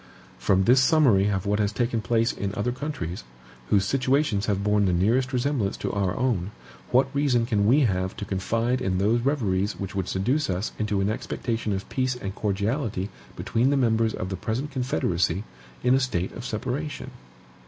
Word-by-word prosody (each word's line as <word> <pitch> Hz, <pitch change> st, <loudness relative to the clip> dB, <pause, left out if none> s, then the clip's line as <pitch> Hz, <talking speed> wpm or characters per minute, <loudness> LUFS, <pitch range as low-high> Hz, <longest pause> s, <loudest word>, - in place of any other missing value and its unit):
From 95 Hz, -1 st, +3 dB
this 125 Hz, +5 st, +5 dB
summary 130 Hz, -9 st, +4 dB
of 95 Hz, -1 st, -1 dB
what 105 Hz, +1 st, +1 dB
has 105 Hz, -1 st, +1 dB
taken 120 Hz, 0 st, -1 dB
place 115 Hz, +1 st, +1 dB
in 100 Hz, 0 st, -4 dB
other 105 Hz, +4 st, 0 dB
countries, 125 Hz, -, -5 dB, 0.5 s
whose 100 Hz, -1 st, +3 dB
situations 130 Hz, -3 st, +1 dB
have 100 Hz, -2 st, 0 dB
borne 105 Hz, 0 st, +3 dB
the 90 Hz, -, +2 dB
nearest 120 Hz, +9 st, +2 dB
resemblance 125 Hz, -5 st, 0 dB
to -, -, -3 dB
our 100 Hz, -3 st, -1 dB
own, 115 Hz, -8 st, 0 dB, 0.4 s
what 135 Hz, +2 st, +2 dB
reason 135 Hz, -5 st, +2 dB
can 105 Hz, -4 st, +1 dB
we 135 Hz, +6 st, +5 dB
have 95 Hz, -6 st, 0 dB
to 105 Hz, -, -4 dB
confide 115 Hz, +6 st, -1 dB
in 95 Hz, -1 st, 0 dB
those 110 Hz, +5 st, +2 dB
reveries 105 Hz, -8 st, 0 dB
which 95 Hz, -1 st, -5 dB
would 95 Hz, -2 st, -2 dB
seduce 125 Hz, +10 st, 0 dB
us 95 Hz, +3 st, -2 dB
into 105 Hz, -2 st, 0 dB
an 100 Hz, -, +1 dB
expectation 115 Hz, 0 st, -3 dB
of 95 Hz, -1 st, -3 dB
peace 130 Hz, -1 st, 0 dB
and 95 Hz, -6 st, -5 dB
cordiality 105 Hz, 0 st, -1 dB, 0.3 s
between 120 Hz, +4 st, +1 dB
the 140 Hz, -, +2 dB
members 115 Hz, -3 st, +2 dB
of 90 Hz, -, -4 dB
the 95 Hz, -, -3 dB
present 120 Hz, -, -3 dB
confederacy, 90 Hz, -, 0 dB, 0.4 s
in 125 Hz, +1 st, +4 dB
a 135 Hz, -, +4 dB
state 95 Hz, -9 st, -1 dB
of -, -, -8 dB
separation? 135 Hz, +6 st, -4 dB
110 Hz, 185 wpm, -25 LUFS, 95-130 Hz, 0.5 s, this